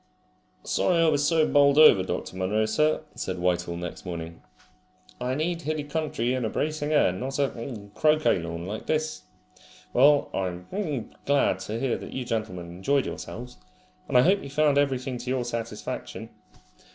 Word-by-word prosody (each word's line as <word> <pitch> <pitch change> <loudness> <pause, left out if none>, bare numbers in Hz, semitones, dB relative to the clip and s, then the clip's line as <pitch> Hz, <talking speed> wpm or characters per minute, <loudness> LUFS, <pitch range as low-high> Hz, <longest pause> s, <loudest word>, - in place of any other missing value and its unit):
"Sorry 180 - +1
I 165 - +4
was 145 -1 +2
so 160 -1 +3
bowled 140 -1 +4
over, 155 -11 +8
Dr. 95 - -4
Munro, 100 +4 +1
sir," 150 +9 +1
said 95 - -4
Whitehall 90 -1 0
next 90 0 -6
morning. 85 -2 -6 0.8
"I 125 +1 -1
need 165 +3 -1
hilly 155 -1 -2
country 145 -5 -1
and 130 -1 -1
a 110 - 0
bracing 155 +2 -2
air, 150 -11 +4
not 130 +9 -4
a 115 -6 -3
croquet 155 -7 +3
lawn 85 0 -5
like 105 +4 -6
this. 155 0 -1 0.7
Well, 145 +3 +5
I'm 90 -1 -3 0.6
glad 140 0 +3
to 110 +2 -4
hear 130 -2 0
that - - -9
you 130 -1 -3
gentlemen 95 -7 -3
enjoyed 95 +12 0
yourselves, 125 +2 -7 0.5
and - - +3
I 125 - +7
hope 195 +6 +3
you 140 - -8
found 145 0 +3
everything 130 -3 -1
to 125 +1 -6
your 130 -1 0
satisfaction." 115 -2 -5
125 Hz, 165 wpm, -26 LUFS, 100-150 Hz, 0.8 s, over